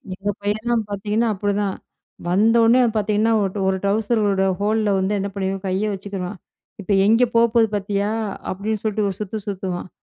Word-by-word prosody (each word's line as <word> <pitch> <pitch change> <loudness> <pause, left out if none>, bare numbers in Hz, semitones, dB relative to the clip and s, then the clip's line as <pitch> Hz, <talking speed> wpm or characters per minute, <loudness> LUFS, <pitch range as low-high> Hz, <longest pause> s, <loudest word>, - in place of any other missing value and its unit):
எங்க 205 +2 -2
பையன்லாம் 220 +3 0
பார்த்தீங்கன்னா, 210 +3 -1
அப்பிடிதான் 205 0 -1 0.5
வந்தவுனே 225 +6 +4 0.2
பார்த்தீங்கன்னா, 215 +2 +1
ஒ - - +1 0.2
ஒரு 190 - +1
ட்வுசரோட 205 -1 +1 0.2
ஹோல்ல 210 0 +1
வந்து 200 +2 0
என்ன 200 +1 -2
பண்ணிருவான், 195 0 -3
கைய 195 +3 0
வச்சுக்குருவான். 195 -1 -6 0.4
இப்ப 200 - -4 0.2
எங்கே 230 +3 +5
போ 230 - +6
போது 225 -1 +5
பார்த்தியா? 200 0 -1 0.4
அப்பிடின்னு 205 +3 -3
சொல்லிட்டு 215 -1 0
ஒரு 190 - -6
சுத்து 210 +1 -4
சுத்துவான், 185 -2 -4
205 Hz, 150 wpm, -21 LUFS, 195-220 Hz, 0.5 s, போ